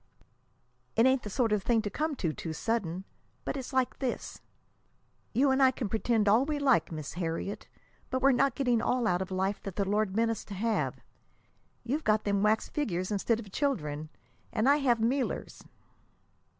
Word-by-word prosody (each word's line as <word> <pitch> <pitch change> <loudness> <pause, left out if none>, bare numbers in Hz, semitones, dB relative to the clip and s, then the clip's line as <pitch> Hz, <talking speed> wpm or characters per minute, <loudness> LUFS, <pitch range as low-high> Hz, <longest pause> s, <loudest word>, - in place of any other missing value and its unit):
"It 225 - +5
ain't 260 0 +4
the 210 - -6
sort 230 +2 +1
of 210 -1 +2
thing 225 +2 +2
to 205 - -2
come 305 +6 -1
to 165 -11 -1
too 160 +1 -5
sudden. 190 -2 -2 0.4
But - - -2
it's 265 -1 -5
like 260 -2 0
this. 260 -3 -4 0.9
You 265 +4 +3
and 265 +1 +2
I 265 - +7
can 250 -4 -3
pretend 220 0 +1
all 220 +5 +5
we 295 +1 -1
like, 265 - +3
Miss 155 -3 -5
Harriet; 175 +3 -4 0.4
but 260 - 0
we're 275 +1 +5
not 270 0 +2
getting 245 -5 +2
all 245 0 +1
out 180 -3 +1
of 190 - -4
life 190 +2 -1
that 195 -3 -7
the 200 -2 0
Lord 205 -1 0
meant 225 +1 +2
us 225 - -4
to 200 - -7
have. 220 +3 -1 0.8
You've 280 +6 -2
got 215 0 +2
them 200 -1 +1
wax 215 +1 +2
figures 185 - -2
instead 220 +3 +1
of 210 -4 -9
children, 155 - -2 0.4
and 230 +1 +1
I 285 +1 +6
have 260 -5 +3
mealers." 250 +4 -1
225 Hz, 190 wpm, -30 LUFS, 195-260 Hz, 0.9 s, I